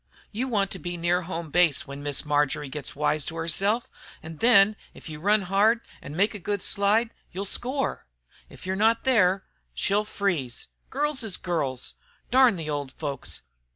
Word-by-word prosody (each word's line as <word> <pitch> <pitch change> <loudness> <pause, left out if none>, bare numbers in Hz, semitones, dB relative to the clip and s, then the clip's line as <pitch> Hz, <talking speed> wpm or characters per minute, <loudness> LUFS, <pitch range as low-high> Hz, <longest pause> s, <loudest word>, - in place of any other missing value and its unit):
You 240 +5 -2
want 200 -5 +1
to 190 - -4
be 175 0 -5
near 175 +1 +1
home 170 -3 -5
base 175 -4 +3
when 140 0 -8
Miss 145 0 0
Marjory 145 -1 0
gets 140 0 -5
wise 150 +1 +1
to 165 - -4
herself, 195 +8 +1 0.3
an' 160 0 -8
then, 215 -2 +6 0.2
if - - -12
you 155 -2 -7
run 205 +4 +3
hard 205 +5 +3 0.2
an' 145 - -8
make 200 +6 +2
a 210 - -6
good 200 +1 -2
slide, 215 +3 +2 0.2
you'll 195 +3 -4
score! 255 - -1 0.4
If - - -13
you're 190 +1 -1
not 225 +3 +3
there 195 -7 +3 0.3
she'll 205 - +1
freeze. 175 - -2 0.2
Girls 290 0 0
is 220 -5 0
girls. 145 -8 -2 0.4
Darn 255 -3 +6
the 165 -3 -6
old 145 -3 -3
folks! 140 - -5
185 Hz, 175 wpm, -26 LUFS, 155-215 Hz, 0.4 s, then